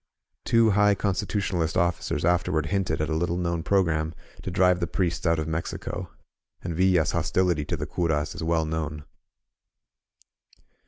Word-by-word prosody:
Two 115 -1 +4
high 105 0 +4
Constitu 100 +1 -1
tionalist 85 -4 -1
officers 85 -3 0
afterward 85 -3 +1
hinted 95 +2 -1
at 75 - -1
a - - +1
little 85 +1 0
known 85 -2 -1
pro 95 +3 +3
gram 80 -1 -1 0.3
to - - -5
drive 90 -1 +3
the 85 - -1
priests 85 0 -1
out 85 0 +3
of 80 0 -2
Mexico; 80 +1 -4 0.5
and 85 - -3
Villa's 90 -2 +3
hostility 85 -1 +1
to - - -2
the - - -3
euros 80 -3 -1
is - - -7
well 80 0 +1
known. 75 -1 -4
85 Hz, 160 wpm, -26 LUFS, 80-90 Hz, 0.5 s, Two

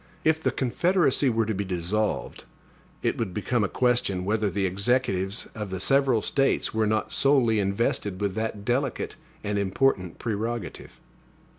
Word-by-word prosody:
If 160 0 +3
the - - +2
Confederacy 145 +1 +2
were 115 -1 +1
to 110 - -1
be 100 0 -2
dissolved, 95 +3 -2 0.6
it - - 0
would 100 -6 -3
become 110 +2 0
a 95 - 0
question, 120 -7 +1
whether 105 0 +1
the 100 0 -1
Executives 100 0 0
of 105 -2 -5
the 95 0 -4
several 135 0 +3
States 135 -1 +1
were 110 -1 +1
not 110 +1 -1
solely 130 -6 +3
invested 100 -1 -1
with 100 -2 -1
that 110 -1 -3
delicate 130 +2 -1 0.3
and 105 0 -1
important 95 -2 +1
prerogative. 115 -2 -4
110 Hz, 150 wpm, -26 LUFS, 100-125 Hz, 0.6 s, If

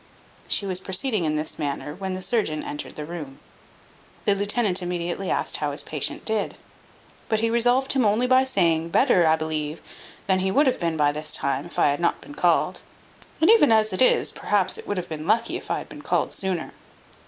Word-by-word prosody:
She 200 - 0
was 185 -2 -2
proceeding 190 +1 0
in 155 -1 0
this 155 +1 -3
manner 145 0 -3
when 190 +2 -4
the 185 - -4
surgeon 190 -11 0
entered 145 - -6
the 150 - -6
room. 150 -5 -7 0.9
The 205 - +4
lieutenant 205 -1 +1
immediately 175 +1 -3
asked - - 0
how - - -2
his - - -2
patient - - -3
did. 220 -2 -1 0.7
But 220 -1 +1
he 230 0 +1
resolved 245 +3 +2
him 265 -2 +2
only 215 +3 +2
by 255 +1 +5
saying, 170 -9 +1
"Better, 180 - +4
I 160 - +5
believe, 155 -1 -3 0.5
than 190 -1 +2
he 190 +1 0
would 280 +10 +3
have 260 - +1
been 165 -2 -1
by 145 -1 +3
this 150 +1 -4
time, 140 +4 -1
if - - -12
I - - +4
had 145 - -1
not 170 - +1
been 290 - -12
called; - - +1 0.6
and 325 +6 +6
even 415 - +6
as 220 -2 +3
it 185 - 0
is, 255 - +4
perhaps 195 -3 0
it - - -11
would 205 - -2
have 180 - -3
been 155 0 -6
lucky 230 - +1
if - - -7
I - - +1
could - - -3
have - - -11
been - - -10
called - - -1
sooner." 185 -4 -3
185 Hz, 215 wpm, -24 LUFS, 160-225 Hz, 0.9 s, and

